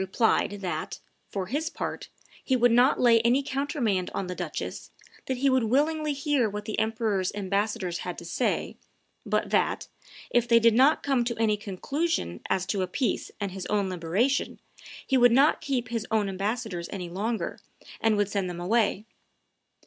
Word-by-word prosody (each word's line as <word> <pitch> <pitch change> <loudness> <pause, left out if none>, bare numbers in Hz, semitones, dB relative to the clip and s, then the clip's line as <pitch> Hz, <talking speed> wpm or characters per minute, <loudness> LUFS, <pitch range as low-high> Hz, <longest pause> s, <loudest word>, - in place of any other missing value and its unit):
replied 190 +4 +2
that, 180 -2 -4 0.3
for 195 -2 -3
his 295 - -2
part, - - -5 0.3
"he 260 - +1
would 245 -1 +4
not 245 +4 +4
lay 235 -2 +6
any 245 +4 +3
countermand 265 - -1
on 195 - -2
the 180 - -4
duchess, - - -5 0.4
that 260 - -1
he 275 +3 +1
would 260 -3 +3
willingly 300 +6 +1
hear 280 -4 +1
what 210 0 -6
the 215 - -2
emperor's 220 -4 0
ambassadors 200 -2 -1
had 180 - -5
to 170 - -8
say, 240 +8 -1 0.5
but - - 0
that, - - +1 0.4
if 240 0 +2
they 230 -1 +6
did 230 0 +5
not 265 +7 +4
come 270 -4 +2
to 235 -1 -3
any 220 -2 +2
conclusion 210 - -2
as 185 -1 +1
to 195 0 -1
a 185 - 0
peace 245 +7 -1
and 200 -2 -2
his 185 -1 -6
own 200 -2 0
liberation, 185 +10 0 0.5
he 265 - +2
would 245 -1 +6
not 275 +6 +4
keep 250 -4 -2
his 230 -2 -3
own 215 -2 +1
ambassadors 195 -2 -3
any 185 -3 -5
longer, 210 +6 -3 0.4
and 220 -1 +2
would 205 -1 +2
send 195 -2 -2
them 175 -1 -6
away." 210 +2 +1
225 Hz, 175 wpm, -27 LUFS, 195-255 Hz, 0.5 s, lay